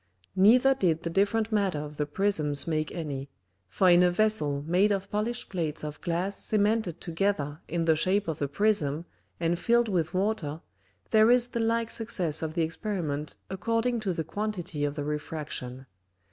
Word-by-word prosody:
Neither 245 +8 +6
did 170 -9 0
the 170 - -3
different 210 +5 +1
matter 200 -6 +1
of 150 0 -6
the 150 - -1
Prisms 150 -4 0
make 155 -2 -1
any: 140 -5 -5 0.4
for 190 - +2
in 175 0 +7
a 180 - +5
Vessel 175 -8 +1
made 185 +6 +3
of 195 0 -2
polished 220 +3 -2
Plates 160 -6 -3
of 150 0 -6
Glass 175 +4 -2
cemented 210 -4 +1
together 165 -4 -1
in 170 0 -1
the 160 -1 +4
shape 190 +5 +1
of 160 -3 -3
a 145 - +1
Prism 160 -3 +1 0.3
and 170 0 0
filled 235 +4 +3
with 175 -3 -1
Water, 185 -6 -1 0.5
there 220 0 +6
is 245 0 +4
the 235 - -3
like 230 0 0
Success 180 -9 0
of 160 0 -4
the 170 - +2
Experiment 160 -4 -3
according 230 +5 0
to 205 -3 -1
the 165 -2 -2
quantity 180 -5 -3
of 145 0 -2
the 145 - -3
Refraction. 150 -4 -5
175 Hz, 175 wpm, -28 LUFS, 155-210 Hz, 0.5 s, in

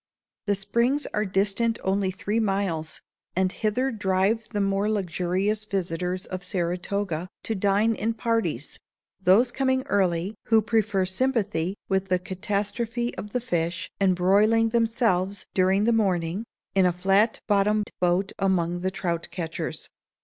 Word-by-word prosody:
The 205 - +3
Springs 235 +8 0
are 210 +1 +1
distant 205 +4 +1
only 190 0 +1
three 205 +4 -2
miles; 195 -7 -1 0.3
and 185 0 +2
hither 245 +7 0
drive 205 +1 0
the 210 - -2
more 195 +1 +1
luxurious 195 +1 0
visitors 185 -2 -2
of 185 -1 -6
Saratoga, 180 -1 -2 0.2
to 225 - -1
dine 205 +2 +2
in 225 +1 -2
parties,—those 215 - 0
coming 260 0 +1
early 185 0 +1
who 220 -1 +4
prefer 210 -3 +1
sympathy 200 -4 0
with 190 0 0
the 185 -1 +2
catastrophe 210 +6 -2
of 210 - -7
the 250 - 0
fish, 175 -4 -2
and 190 -2 +3
broiling 210 +5 +4
themselves, 225 -5 +1
during 190 +2 +3
the 235 +2 +3
morning, 190 -2 0 0.3
in 190 -2 +4
a - - +3
flat 195 +5 +2
bottomed 210 0 +2
boat 180 +2 +1
among 175 -3 +1
the 185 +1 -1
trout 170 -3 -2
catchers. 165 -2 -4
195 Hz, 135 wpm, -25 LUFS, 185-220 Hz, 0.3 s, who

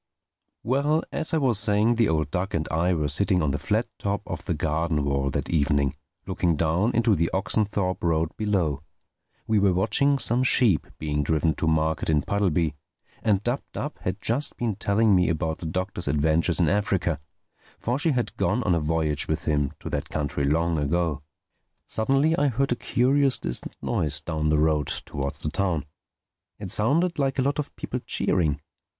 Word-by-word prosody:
Well, 140 +6 +1
as 160 - -3
I 160 - +2
was 130 -8 +2
saying, 105 +2 +3
the 115 -2 +2
old 80 -3 0
duck 90 +1 -2
and 80 -1 -1
I 85 +3 +1
were 75 -2 0
sitting 90 +4 +1
on 75 - +1
the 75 - -2
flat 110 +3 0
top 100 0 -2
of - - -6
the 85 - -1
garden 80 0 0
wall 70 -1 0
that 70 0 -2
evening, 70 -3 +1 0.3
looking 85 -2 0
down 85 +9 +1
into 115 -2 +3
the 85 -2 +1
Oxenthorpe 100 -1 0
Road 80 -1 +1
below. 90 -10 0 0.6
We 110 -1 +2
were 100 -2 +3
watching 140 +9 +2
some 120 -1 +2
sheep 120 -8 +3
being 75 -1 -1
driven 80 +2 +1
to 80 - -2
market 80 0 +1
in 75 -2 +2
Puddleby; 90 -6 +1 0.5
and 105 -3 +1
Dab 120 +4 -1
Dab 145 - -5
had 90 +2 -3
just 125 +8 -1
been 115 -4 -1
telling 105 +2 +2
me 90 -1 +3
about 80 -1 -1
the 85 - -5
Doctor's 90 +2 -3
adventures 80 +3 +1
in 85 - +3
Africa. 95 -5 0 0.6
For 120 +4 -2
she 165 - +1
had 125 -5 -1
gone 120 +4 +1
on 95 - +2
a 85 - +2
voyage 75 -1 -1
with 80 +1 -2
him 75 -3 +1
to - - -5
that 75 +1 -3
country 70 -2 -2
long 80 +2 +1
ago. 75 0 0 0.6
Suddenly 135 +8 +2
I 145 - +3
heard 135 +1 0
a - - +3
curious 135 +3 +2
distant - - -2
noise 75 -1 0
down 75 0 -2
the 75 - +3
road, 75 -2 +2 0.2
towards 70 -1 -4
the 75 - -1
town. 85 -7 -1 0.7
It - - -7
sounded 160 +10 +1
like 135 -1 0
a 130 - +2
lot 140 +2 0
of 150 - -4
people - - -4
cheering. 80 -5 0
90 Hz, 185 wpm, -25 LUFS, 75-110 Hz, 0.7 s, saying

